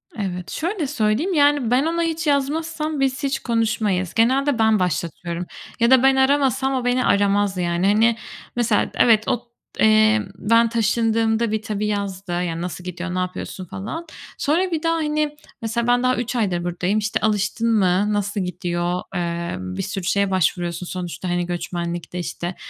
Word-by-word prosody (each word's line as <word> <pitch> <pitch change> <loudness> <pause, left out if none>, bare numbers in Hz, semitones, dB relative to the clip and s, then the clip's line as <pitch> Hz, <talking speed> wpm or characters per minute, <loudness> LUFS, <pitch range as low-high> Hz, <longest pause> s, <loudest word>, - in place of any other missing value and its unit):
Evet, 180 -3 -4
şöyle 340 -2 -2
söyleyeyim: 230 - 0
Yani 285 -6 +3
ben 265 +4 +3
ona 335 +1 0
hiç 325 -1 -2
yazmazsam 305 +2 -1
biz 270 +1 0
hiç 270 0 0
konuşmayız. 215 -6 0
Genelde 260 +3 +2
ben 220 -2 +4
başlatıyorum 170 0 -2 0.3
ya 235 +2 +3
da 260 -1 +6
ben 270 0 +5
aramasam 265 0 +2
o 255 -2 -1
beni 245 0 +2
aramaz 200 -1 +2
yani. 175 +1 0
Hani, 225 +3 +3 0.4
mesela 235 -3 +1
evet, 220 -3 +4
ot 240 0 -1 0.3
eee, 215 0 +5
ben 230 +4 +3
taşındığımda 225 0 +1
bir 220 0 -1
tabii 210 -1 -2
yazdı. 200 -3 -3
Yani 175 -1 -2
"Nasıl 180 0 -5
gidiyor? 180 0 -5
Ne - - 0
yapıyorsun?" 185 0 -4
falan. 220 - -6 0.3
Sonra 345 +5 +1
bir 320 0 -2
daha, 330 0 +2
hani, 300 -1 -1 0.2
mesela 230 +1 -1
ben 245 0 +3
daha 255 0 +3
3 245 +1 -3
aydır 190 -7 0
buradayım. 180 +4 0
İşte 210 +1 -1
"Alıştın 220 +2 +1
mı? 200 0 +2
Nasıl 205 0 -1
gidiyor?" 175 0 -2
Emm, 170 - -3
bir - - -1
sürü 195 -1 -4
şeye 200 +2 +1
başvuruyorsun 175 -1 0
sonuçta. 180 0 -5
Hani 175 0 0
göçmenlikte 175 0 -4
işte 175 +1 -4
215 Hz, 165 wpm, -22 LUFS, 180-255 Hz, 0.4 s, da